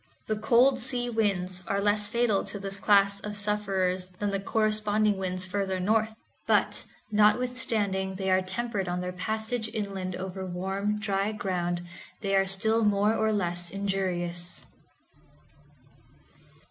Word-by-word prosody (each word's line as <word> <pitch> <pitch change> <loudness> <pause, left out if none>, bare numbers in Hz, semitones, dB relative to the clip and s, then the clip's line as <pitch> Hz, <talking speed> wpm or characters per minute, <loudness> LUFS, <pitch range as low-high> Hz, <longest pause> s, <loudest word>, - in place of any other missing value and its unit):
The 215 - -1
cold 250 +4 +4
sea 245 0 -1
winds 185 -5 0
are 200 - 0
less 205 +1 +2
fatal 235 -3 +2
to - - -3
this 195 0 -4
class 200 -1 +4
of 210 0 -4
sufferers 195 -3 0
than 205 +1 -1
the 195 - -1
corresponding 215 0 +1
winds 185 -1 -2
further 190 0 -2
north, 220 +3 +1 0.3
but, - - +2 0.3
notwithstanding 210 -3 +2
they 190 0 -1
are 185 0 +4
tempered 195 +1 -2
on 180 0 -2
their 180 0 -3
passage 220 +4 -2
inland 195 -3 -3
over 190 +1 -5
warm, 190 +3 -2
dry 205 0 -1
ground, 175 -4 -2 0.4
they 195 -2 0
are 195 0 +3
still 220 +4 +2
more 210 +1 +3
or 220 0 +1
less 175 -4 -1
injurious. 180 -3 -2
200 Hz, 135 wpm, -28 LUFS, 185-215 Hz, 0.4 s, cold